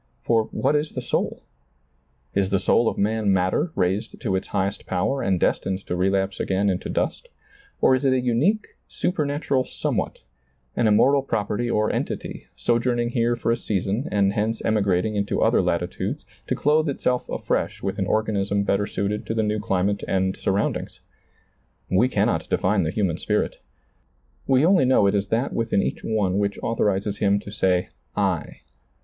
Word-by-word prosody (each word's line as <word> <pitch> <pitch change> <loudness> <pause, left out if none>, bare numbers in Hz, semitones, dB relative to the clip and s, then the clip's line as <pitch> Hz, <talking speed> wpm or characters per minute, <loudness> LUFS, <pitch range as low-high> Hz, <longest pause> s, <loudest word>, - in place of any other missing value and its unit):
For 115 -2 +2
what 145 - 0
is 150 +1 -1
the 125 - -3
soul? - - -2 0.9
Is 95 -1 +1
the 100 - +2
soul 115 +4 +3
of - - -6
man 105 0 +1
matter 95 - +1
raised 95 +2 -1
to 100 -7 0
its 95 - -2
highest 95 +1 -2
power 135 +9 0
and 95 -2 +1
destined 95 +3 0
to 90 - -2
relapse 95 +1 0
again 100 +1 +1
into 90 - -4
dust? - - -2 0.5
Or - - +5
is 130 +1 +1
it 135 - +3
a 130 - +3
unique, 130 - +1 0.2
supernatural 145 -5 -1
somewhat, - - -3 0.5
an 120 - +2
immortal 135 +7 +4
property 115 -1 -2
or 110 -2 +1
entity, - - -4
sojourn 120 +1 +1
ing 120 0 0
here 120 -1 +1
for 115 0 -1
a - - +3
season 105 +4 -2
and 100 -1 +2
hence 110 +1 -1
emigrating 105 -1 +1
into 100 0 0
other - - +4
latitudes - - -2 0.2
to - - 0
clothe 155 +1 +2
itself 125 -2 -1
afresh - - -2
with - - -2
an - - 0
organism 100 -2 0
better 100 0 +1
suited 100 +2 -2
to 110 - -2
the 110 - +1
new 105 0 0
climate 100 -1 0
and 95 0 0
surroundings? 100 +1 -1 0.9
We 115 +7 +4
cannot - - 0
define 95 +1 +2
the 80 - 0
human 90 -3 -1
spirit. - - -1 0.9
We 135 +2 +4
only 180 -5 +5
know 125 -5 +4
it 100 - +3
is 100 -1 0
that 115 +6 0
within 115 -4 +1
each - - -3
one 100 -4 0
which 100 0 -1
authorizes 100 -2 0
him 100 0 +3
to 100 - -9
say 95 -3 +1 0.3
I. - - -1
105 Hz, 170 wpm, -24 LUFS, 95-120 Hz, 0.9 s, Or